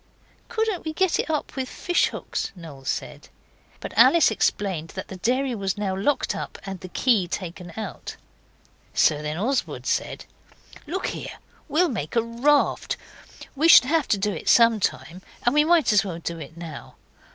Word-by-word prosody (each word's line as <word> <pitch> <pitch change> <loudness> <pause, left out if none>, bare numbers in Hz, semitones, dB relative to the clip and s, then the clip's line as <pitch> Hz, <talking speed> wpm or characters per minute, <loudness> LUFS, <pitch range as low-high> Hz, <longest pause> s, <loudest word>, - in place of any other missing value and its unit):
'Couldn't 445 -5 -1
we 315 - -4
get 375 +1 +1
it - - -2
up 305 -2 -2
with 260 -2 -3
fish 350 -1 +1
hooks?' - - -4
Noel 155 -6 -11
said. - - -4 0.5
But - - -8
Alice 335 -8 +6
explained 190 -6 -1
that - - -6
the 190 - -7
dairy 255 +6 0
was 195 -3 -2
now 195 -2 -1
locked 240 +10 0
up - - -6
and 195 -2 -6
the 185 - -8
key 210 -2 +2
taken 175 0 -6
out. 220 - -6 0.8
So 150 -2 +3
then 150 +1 -4
Oswald 250 +8 -1
said - - -2 0.6
'Look 370 +5 -3
here, - - -7 0.3
we'll 325 +5 +3
make 190 - -4
a 230 - +3
raft. 245 +6 +1 0.6
We 310 +4 +3
should 255 - +9
have 310 +1 +1
to 205 - +2
do 205 +1 -1
it - - -3
some 230 -2 +6
time, 165 +2 -3 0.2
and 240 - +3
we 300 0 +5
might 325 -6 +3
as 210 - +5
well 185 -5 -5
do 170 0 -5
it 160 +2 -10
now. 165 -4 -9
220 Hz, 175 wpm, -24 LUFS, 175-290 Hz, 0.8 s, should